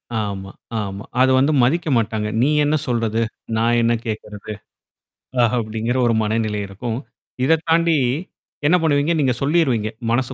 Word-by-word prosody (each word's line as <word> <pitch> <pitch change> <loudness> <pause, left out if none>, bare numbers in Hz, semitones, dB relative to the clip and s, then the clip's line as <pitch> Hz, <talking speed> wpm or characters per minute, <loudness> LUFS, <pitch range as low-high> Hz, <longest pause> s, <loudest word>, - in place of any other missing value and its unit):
ஆமா, 100 -3 -3 0.3
ஆமா. 100 0 -6 0.2
அது 130 - +5
வந்து 140 +3 +3
மதிக்க 165 +7 +1
மாட்டாங்க. 110 -1 -1
நீ 135 - +3
என்ன 145 +1 +2
சொல்றது? 115 -2 0 0.4
நான் 120 +1 +2
என்ன 115 0 +3
கேட்கறது? 105 -1 -6 0.9
ஆ - - +5
அப்படிங்கிற 115 +2 -2
ஒரு 115 - +3
மனநிலை 110 -1 -1
இருக்கும். 110 +4 -4 0.5
இத 160 +5 +4
தாண்டி. 165 0 +3 0.7
என்ன 170 - +5
பண்ணுவீங்க? 155 +1 +2
நீங்க 130 -3 +2
சொல்லிருவீங்க. 135 -8 +2 0.2
மனசு 130 +2 0
115 Hz, 140 wpm, -20 LUFS, 110-140 Hz, 0.9 s, அது